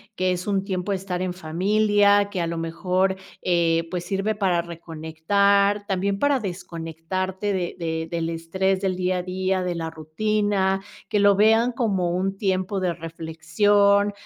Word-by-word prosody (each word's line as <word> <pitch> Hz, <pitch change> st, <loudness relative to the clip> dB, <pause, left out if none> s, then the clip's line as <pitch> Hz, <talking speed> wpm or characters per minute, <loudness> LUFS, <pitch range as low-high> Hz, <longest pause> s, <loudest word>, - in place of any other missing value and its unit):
que 185 Hz, -1 st, +1 dB
es 180 Hz, +2 st, -3 dB
un 195 Hz, -1 st, +1 dB
tiempo 195 Hz, 0 st, -2 dB
de -, -, +1 dB
estar 185 Hz, -1 st, -4 dB
en 185 Hz, -1 st, -2 dB
familia, 205 Hz, +4 st, +2 dB
que 195 Hz, -, -4 dB
a 170 Hz, -, 0 dB
lo 170 Hz, -, -3 dB
mejor, 180 Hz, +3 st, 0 dB, 0.3 s
eh, 165 Hz, -2 st, +2 dB
pues 180 Hz, -1 st, -3 dB
sirve 195 Hz, +3 st, -1 dB
para 185 Hz, -4 st, +1 dB
reconectar, 175 Hz, +5 st, +1 dB
también 195 Hz, +1 st, -1 dB
para 285 Hz, +1 st, +2 dB
desconectarte 185 Hz, +2 st, -4 dB
de 180 Hz, -2 st, -2 dB
de 160 Hz, -1 st, -2 dB
del 165 Hz, -1 st, -1 dB
estrés 185 Hz, +4 st, -1 dB
del 190 Hz, -2 st, 0 dB
día 185 Hz, 0 st, 0 dB
a 180 Hz, -, -4 dB
día, 185 Hz, +1 st, -1 dB
de 180 Hz, -1 st, -2 dB
la 165 Hz, -1 st, -3 dB
rutina, 195 Hz, +4 st, 0 dB, 0.3 s
que 210 Hz, -, +1 dB
lo 200 Hz, -1 st, +5 dB
vean 225 Hz, +3 st, +4 dB
como 195 Hz, -7 st, 0 dB
un 190 Hz, +2 st, -1 dB
tiempo 190 Hz, 0 st, -1 dB
de 180 Hz, -2 st, 0 dB
reflexión, 200 Hz, +6 st, +2 dB
185 Hz, 165 wpm, -24 LUFS, 170-200 Hz, 0.3 s, lo